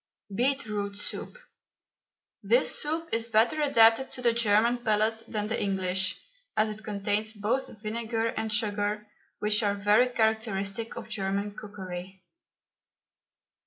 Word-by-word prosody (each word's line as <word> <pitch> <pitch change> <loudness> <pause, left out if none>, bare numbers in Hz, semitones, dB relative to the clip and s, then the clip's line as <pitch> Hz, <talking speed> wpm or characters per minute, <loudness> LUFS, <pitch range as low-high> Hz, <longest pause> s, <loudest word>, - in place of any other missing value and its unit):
BEETROOT 215 -5 0
SOUP. 205 - -5 1.0
This - - +3
soup 325 +2 -2
is 230 0 0
better 230 +8 +3
adapted 235 -2 +5
to 250 - -6
the 235 -1 +4
German 235 +1 +3
palate 220 0 +1
than 210 -1 -2
the 220 +2 -2
English, 190 -1 0 0.4
as 215 0 +3
it 215 +1 -8
contains 210 +1 -1
both 215 +2 -2
vinegar 225 +1 -2
and 220 -1 -3
sugar, 210 0 0 0.3
which 210 +1 +2
are 205 -2 +1
very 205 +5 +4
characteristic 220 -2 -1
of - - -7
German 200 0 -2
cookery. 190 -3 -8
215 Hz, 125 wpm, -28 LUFS, 205-230 Hz, 1.0 s, adapted